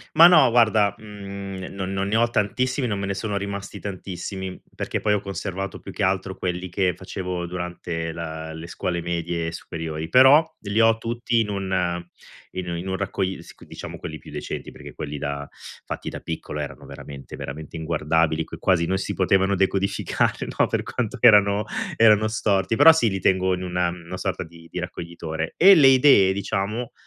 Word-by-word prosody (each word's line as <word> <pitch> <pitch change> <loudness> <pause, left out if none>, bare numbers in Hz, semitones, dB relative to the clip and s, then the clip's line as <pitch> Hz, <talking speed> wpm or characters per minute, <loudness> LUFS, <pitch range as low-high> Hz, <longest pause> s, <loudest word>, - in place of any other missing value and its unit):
Ma 165 +2 +10
no, 175 - +7
guarda, 110 -4 +4
mhmm, 100 -2 -8
non 95 -1 -4
non 95 0 -1
ne 105 - 0
ho 115 +1 +3
tantissimi 125 +5 0
non 105 -4 -1
me 100 - -3
ne 100 - -2
sono 105 0 -3
rimasti 100 0 -5
tantissimi, 95 -1 -6
perché - - -3
poi 105 - +1
ho 105 - +2
conservato 95 -1 -5
più - - -9
che - - -3
altro 95 0 0
quelli 90 0 -3
che 90 0 +1
facevo 90 -2 -5
durante 85 -2 -4
la 80 -1 -6
le 80 +1 -8
scuole 85 0 -3
medie 85 -1 -2
e - - -3
superiori. 80 -1 -6
Però, 135 +5 +7
li 100 +1 -1
ho 115 0 +4
tutti 120 +1 -1
in 110 -2 0
u 100 - -2
in 90 -1 -4
un 85 - -3
in 90 +3 -6
un 95 - -1
raccogli 95 -1 -2
sì, - - -14
c - - -17
diciamo - - -8
quelli - - -7
più - - -13
recenti, - - -5
perché - - -11
quelli 75 0 -5
da 70 0 -4 0.3
fatti - - -5
da - - -7
piccolo, 80 -2 -5
erano 70 - -6
veramente, 70 -1 -10
veramente 75 +3 -7
inguardabili, 80 0 0
che - - -9
quasi 90 -3 +2
non 95 +3 0
si 95 - -3
potevano 95 +1 +2
decodificare, 95 +1 0
no, - - +5
per - - -1
quanto 125 0 -3
erano 105 -3 +6 0.3
erano 110 -4 +5
storti. 105 -2 +1
Però 145 +6 +9
sì, 160 -9 +2
li 95 - -2
tengo 95 0 +2
in 90 - -6
una 90 -1 0
una 85 +1 -7
sorta 95 -1 -2
di 85 0 -15
di - - -6
raccoglitore. 85 -2 -5
E 195 +3 +9
le 150 -7 +7
idee, 130 -8 +6
diciamo, 100 +4 -2
95 Hz, 190 wpm, -23 LUFS, 85-105 Hz, 0.3 s, Ma